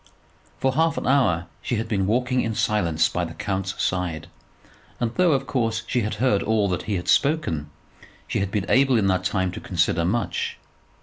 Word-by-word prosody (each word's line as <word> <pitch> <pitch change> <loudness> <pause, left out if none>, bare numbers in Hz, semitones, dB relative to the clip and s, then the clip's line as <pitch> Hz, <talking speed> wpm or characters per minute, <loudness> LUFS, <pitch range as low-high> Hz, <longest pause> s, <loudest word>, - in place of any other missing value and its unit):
For 130 -1 +1
half 160 +3 +2
an - - -3
hour 120 -11 +2 0.2
she 120 - -2
had 110 +1 -2
been 100 -4 0
walking 125 +3 +1
in 115 -1 -2
silence 85 -8 +2
by 90 - -2
the 80 -1 -6
count's 95 +1 -3
side; 90 -4 -1 0.7
and 120 -1 -1
though, 175 0 +3
of 135 0 0
course, 115 -4 -1
she 125 - 0
had 105 -1 -2
heard 105 -2 +2
all 110 -2 +1
that 90 -2 -1
he 105 - +1
had 90 - -4
spoken, 110 - +1 0.6
she - - -1
had 100 - -1
been 100 -1 -1
able 130 -1 +4
in 105 - +2
that 95 -1 +1
time 95 -2 0
to - - -7
consider 85 -1 +1
much. 110 +8 -1
105 Hz, 195 wpm, -24 LUFS, 90-125 Hz, 0.7 s, able